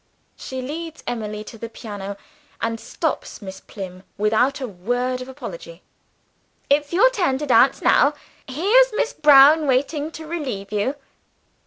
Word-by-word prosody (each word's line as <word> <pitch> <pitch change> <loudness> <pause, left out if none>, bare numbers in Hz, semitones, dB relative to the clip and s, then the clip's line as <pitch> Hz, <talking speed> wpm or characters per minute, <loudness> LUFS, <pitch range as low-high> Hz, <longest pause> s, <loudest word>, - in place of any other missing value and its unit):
She 260 -1 -6
leads 320 +4 -6
Emily 215 -3 -4
to 225 +1 -12
the 230 - -6
piano, 200 -3 -7 0.4
and 230 0 -2
stops - - -4
Miss 190 -2 -9
Plym 185 -3 -9 0.2
without 220 +7 +2
a 260 - -4
word 245 +6 -2
of 255 - -8
apology: - - -9 0.9
"It's 290 0 +2
your 445 +9 +5
turn 350 - 0
to 295 - -4
dance 255 0 +4
now. 290 +1 +4 0.3
Here's 415 - +4
Miss 450 - 0
Brown 295 +1 +7
waiting 285 +3 0
to 320 - -8
relieve 270 -12 -5
you." 210 +7 -1
260 Hz, 145 wpm, -22 LUFS, 215-305 Hz, 0.9 s, Brown